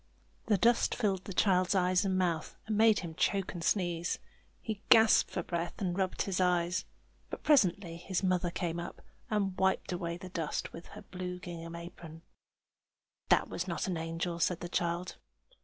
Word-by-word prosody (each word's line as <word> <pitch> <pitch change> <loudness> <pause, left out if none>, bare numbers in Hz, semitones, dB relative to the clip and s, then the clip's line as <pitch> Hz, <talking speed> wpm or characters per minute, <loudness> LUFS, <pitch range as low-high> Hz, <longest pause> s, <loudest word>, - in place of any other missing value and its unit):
The 210 -2 +4
dust 235 +4 +3
filled 195 -5 0
the 195 - -6
child's 185 0 +3
eyes 180 -1 +3
and 190 -1 0
mouth, 170 -4 -1
and 215 - -1
made 220 0 +5
him 170 -3 -6
choke 195 +3 0
and 175 -2 -6
sneeze. 175 -3 0 0.4
He 220 -3 -5
gasped 225 -1 +7
for - - -3
breath, 170 0 -3
and 180 -3 -1
rubbed 190 -1 0
his 190 -2 -2
eyes; 180 0 +1 0.4
but - - -7
presently 190 - +3
his 185 +2 -3
mother 180 -1 +1
came 170 -1 -3
up, 170 - -7 0.3
and 200 -3 0
wiped 190 0 +1
away 170 -1 -3
the 185 +1 -9
dust 165 -4 -3
with 170 - -9
her - - -9
blue 180 -1 -5
gingham 170 -2 -7
apron. 170 -1 -10 1.1
"That - - +4
was 180 - -4
not 170 - -2
an 185 - -1
angel!" 165 +1 -3
said 170 +1 +1
the 175 - -5
child. 175 +1 -2
180 Hz, 175 wpm, -32 LUFS, 170-190 Hz, 1.1 s, gasped